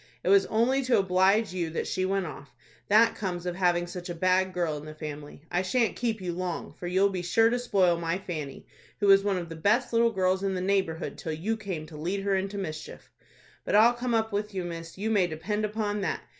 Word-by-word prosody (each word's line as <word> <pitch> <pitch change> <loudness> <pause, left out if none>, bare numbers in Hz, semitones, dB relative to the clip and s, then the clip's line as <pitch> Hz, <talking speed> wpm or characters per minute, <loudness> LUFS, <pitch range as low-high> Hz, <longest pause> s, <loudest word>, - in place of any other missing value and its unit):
It - - 0
was 195 0 +5
only 245 +5 +2
to 255 - +3
oblige 195 +2 +3
you 175 -3 -2
that 160 - -3
she 185 - -1
went 195 0 0
off. 140 -3 -10 0.3
That 225 +3 +5
comes 180 -4 -4
of 180 -1 -2
having 175 -2 +2
such 175 +1 -7
a 175 - -4
bad 185 +2 +2
girl 175 -4 -1
in 145 - -9
the 155 0 -9
family. 150 -1 -8
I 175 - +1
shan't 225 +5 +1
keep 230 -3 -1
you 180 -2 -3
long, 180 -1 -4
for 175 - -7
you'll 190 +3 +3
be 185 -2 -3
sure 225 +6 +3
to 245 - 0
spoil 190 -8 +2
my 165 +1 -1
Fanny, 155 -8 -6 0.3
who 205 - +1
was 195 0 +6
one 200 -2 +1
of 175 -1 -4
the 165 - -8
best 215 +10 +1
little 230 0 +4
girls 190 -3 +1
in 195 -1 -1
the - - -2
neighborhood 185 -3 -1
till 160 - -4
you 190 +9 -2
came 190 -8 -5
to 155 -1 -11
lead 180 +6 -2
her 200 0 0
into 195 +1 -2
mischief. 155 -5 -7 0.5
But - - 0
I'll 225 +3 +7
come 240 0 -1
up 220 0 0
with 205 0 -2
you, 185 - -2
miss, 165 -1 -7
you 215 +3 -2
may 195 -5 +3
depend 195 +7 -2
upon 210 -1 -2
that. 190 - -2
190 Hz, 240 wpm, -28 LUFS, 175-210 Hz, 0.5 s, I'll